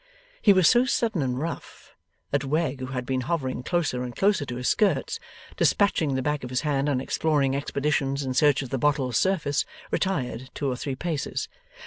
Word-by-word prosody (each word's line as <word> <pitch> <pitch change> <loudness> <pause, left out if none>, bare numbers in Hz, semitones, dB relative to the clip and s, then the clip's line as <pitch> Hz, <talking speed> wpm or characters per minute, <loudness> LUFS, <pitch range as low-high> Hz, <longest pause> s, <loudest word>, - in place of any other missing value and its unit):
He 205 - +6
was 185 -3 +5
so 240 0 +6
sudden 225 - 0
and 125 -2 -1
rough, 165 +5 -6 0.4
that 145 0 +1
Wegg, 145 -1 0
who 130 - -4
had 125 -1 -4
been 130 0 -1
hovering 130 -4 -2
closer 160 -5 -1
and 125 -1 -5
closer 195 -8 +2
to 120 - -4
his 125 +1 -3
skirts, 185 -11 +1 0.4
despatching 160 -8 +2
the 130 - -1
back 150 -1 -1
of 125 - -5
his 125 0 0
hand 145 -1 0
on 135 -3 +1
exploring 140 0 +1
expeditions 140 0 -1
in 130 -1 -2
search 145 +1 +3
of 130 - -9
the 135 - -1
bottle's 135 -5 +1
surface, 155 -7 +1 0.3
retired 130 - -1
two 145 - -2
or 130 - 0
three 135 +2 -4
paces. 155 +1 -3
140 Hz, 190 wpm, -26 LUFS, 130-160 Hz, 0.4 s, He